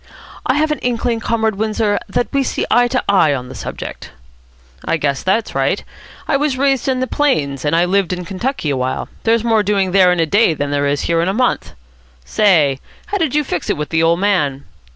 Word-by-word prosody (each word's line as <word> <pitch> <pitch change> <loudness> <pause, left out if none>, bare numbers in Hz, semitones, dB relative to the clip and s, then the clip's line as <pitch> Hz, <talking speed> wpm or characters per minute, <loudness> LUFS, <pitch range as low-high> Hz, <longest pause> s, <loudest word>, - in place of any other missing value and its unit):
"I 255 - +2
have 305 +1 +1
an 300 - -1
inkling, 240 -1 -1
Comrade 220 -2 -1
Windsor, 215 -1 0
that 215 +3 0
we 275 - +2
see 265 - -2
eye 245 +1 +4
to 255 +1 -1
eye 170 -8 +4
on 125 -1 -6
the - - -8
subject." - - -7 0.7
"I - - 0
guess 140 -3 -1
that's 215 +4 0
right. - - 0 0.4
I 280 - +2
was 285 -2 0
raised 270 -1 +1
in 260 -1 0
the - - +1
plains, 150 - 0
and 150 +2 +1
I 170 +1 +3
lived 190 0 +1
in 180 -1 -4
Kentucky 195 - -2
a 135 - -1
while. 130 0 -2 0.2
There's 225 0 +2
more 225 -2 +3
doing 200 -2 0
there 185 -1 +5
in 180 - 0
a 165 - +3
day 185 0 +3
than 145 -1 -3
there 145 0 +1
is 140 0 0
here 165 -1 +1
in 170 - 0
a 190 - 0
month. 250 +1 0 0.5
Say, 155 - +3 0.3
how 405 - +1
did 310 -5 0
you 300 - +3
fix 180 - -4
it - - 0
with 150 0 -4
the 160 -1 +1
old 165 +1 +3
man?" 150 -9 0
200 Hz, 225 wpm, -17 LUFS, 160-245 Hz, 0.7 s, there